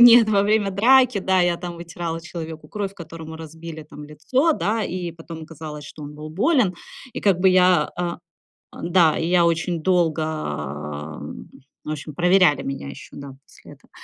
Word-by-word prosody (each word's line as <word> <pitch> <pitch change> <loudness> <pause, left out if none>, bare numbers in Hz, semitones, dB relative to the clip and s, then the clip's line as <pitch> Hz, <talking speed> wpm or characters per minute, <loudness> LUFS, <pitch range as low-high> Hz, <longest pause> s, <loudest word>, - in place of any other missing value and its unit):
Нет, 240 -2 +9
во 200 -2 +4
время 210 -1 +2
драки, 250 +3 +5
да, 190 -1 +2
я 175 -1 +2
там 175 -1 -6
вытирала 170 -1 -5
человеку 160 -2 -8
кровь, 200 -2 -4
которому 160 -2 -9
разбили 160 0 -9
там 150 0 -11
лицо, 255 - +1
да, 220 -5 0
и 175 -1 -3
потом 165 -1 -9
оказалось, 155 -2 -8
что 150 - -10
он 145 0 -8
был 150 +1 -8
болен. 205 - +2 0.4
И - - -5
как 195 -4 +3
бы 190 - +5
я, 185 -1 +4
а, 175 -1 -2 0.5
ан 170 - -6
Да, 165 -4 +5
и 165 - -1
я 175 -1 +4
очень 165 0 0
долго, 170 -3 +2
м, 75 - -5 0.3
в 150 - -5
общем, 150 0 -6
проверяли 180 -3 +4
меня 135 0 -5
ещё, - - -11
да, 140 -1 -9
после - - -16
этого. - - -22
170 Hz, 180 wpm, -23 LUFS, 155-190 Hz, 0.5 s, Нет